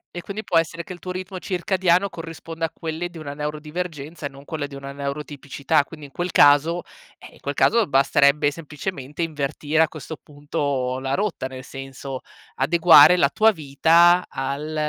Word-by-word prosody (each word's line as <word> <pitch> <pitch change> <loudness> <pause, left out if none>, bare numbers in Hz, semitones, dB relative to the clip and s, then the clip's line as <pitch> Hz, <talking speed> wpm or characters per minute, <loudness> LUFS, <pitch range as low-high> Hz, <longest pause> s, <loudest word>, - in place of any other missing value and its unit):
E - - -3
quindi 205 +4 -6
può 170 - +1
essere 165 +1 0
che - - -11
il 175 - -8
tuo 185 - -6
ritmo 185 0 -6
circadiano 185 0 +1
corrisponda 165 -1 -6
a - - -3
quelle 165 +1 -5
di 175 -1 -13
una 150 -3 -6
neurodivergenza 150 +1 -5
e - - -2
non 140 0 -14
quelle 145 -1 -4
di 140 - -11
una 140 0 -7
neurotipicità. 140 +1 -2
Quindi 150 -2 -11
in - - -21
quel 175 +4 -3
caso 150 +5 +5 0.4
ehm, - - -13
in - - -19
quel 140 - -4
caso 220 +7 +3
basterebbe 140 +1 +3
semplicemente 150 -1 -6
invertire, 155 0 -1
a 160 - +1
questo 155 0 -8
punto, 145 -3 -3
la 135 0 -3
rotta. 190 -6 -1
Nel 130 -1 -9
senso, 135 0 -8 0.3
adeguare 160 +2 +7
la 155 -6 +3
tua 220 +8 +4
vita 165 +3 +4
al 140 +4 -4
155 Hz, 175 wpm, -23 LUFS, 140-170 Hz, 0.4 s, adeguare